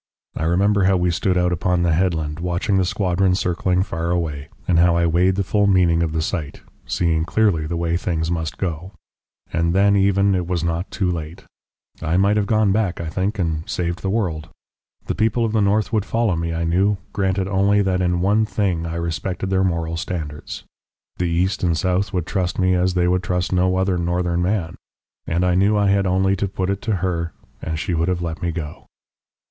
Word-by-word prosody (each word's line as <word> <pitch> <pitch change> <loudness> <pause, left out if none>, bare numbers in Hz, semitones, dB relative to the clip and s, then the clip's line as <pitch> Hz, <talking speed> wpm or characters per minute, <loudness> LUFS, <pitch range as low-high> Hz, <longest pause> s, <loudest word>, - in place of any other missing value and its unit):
I 80 - -2
remember 95 +3 +2
how 95 0 +3
we 90 0 +1
stood 90 +3 0
out 90 0 +2
upon 90 +1 0
the 85 -2 +2
headland 80 -3 0
watching 90 +3 0
the 95 - +2
squadron 90 0 +1
circling 90 0 0
far 85 -3 -3
away, 80 -5 -2 0.2
and 85 -2 +3
how 85 0 +4
I 85 - +2
weighed 90 +3 +2
the 100 - 0
full 105 +2 +1
meaning 90 -4 +3
of 80 -2 0
the 80 0 -1
sight, 80 -5 -4 0.3
seeing 80 -2 +1
clearly 85 -4 +1
the 85 +1 -3
way 85 0 0
things 80 -2 -2
must 80 -2 -3
go. 90 +1 -4 0.6
And 85 +2 +1
then 100 +1 +4
even 100 0 +3
it 90 -2 -1
was 90 -2 -1
not 85 +2 -2
too 95 -3 -1
late. 85 +2 -6 0.6
I 80 +3 0
might 100 +2 +3
have 105 -1 +1
gone 110 -2 +3
back, 100 -4 0
I 85 -2 -4
think, 95 +6 -2
and 80 -4 -2
saved 85 -1 -2
the 95 - -2
world. 90 -8 -2 0.6
The - - -2
people 115 +2 +1
of 110 - -1
the 110 -1 +1
north 105 +3 +1
would 110 -3 +2
follow 115 -3 0
me, 85 0 -2
I 85 0 -2
knew, 95 +5 +2 0.2
granted 95 -1 0
only 100 +1 +2
that 95 -1 0
in 90 -1 +1
one 105 +4 +3
thing 95 -5 -1
I 85 - -4
respected 85 +3 -3
their 95 0 +2
moral 85 -2 -1
standards. 80 -4 -5 0.5
The 90 -1 0
east 90 +3 0
and 85 -2 +2
south 95 +3 0
would 90 -3 -2
trust 90 -2 -2
me 95 0 +2
as 90 0 +1
they 90 -1 +2
would 90 0 +2
trust 90 +1 -1
no 90 0 +2
other 95 -1 +1
northern 85 0 0
man. 90 -2 -1 0.5
And 85 +2 +1
I 90 - +2
knew 100 +4 +3
I 100 -1 +2
had 100 -1 +2
only 95 +1 +2
to 100 - -1
put 95 0 -2
it 100 - -3
to 110 -3 0
her 85 -2 -2 0.3
and 80 -1 -3
she 90 +3 -2
would 85 +1 0
have 90 -1 -1
let 85 +1 -4
me 85 -1 -1
go.... 80 -2 -7
90 Hz, 215 wpm, -21 LUFS, 85-95 Hz, 0.6 s, how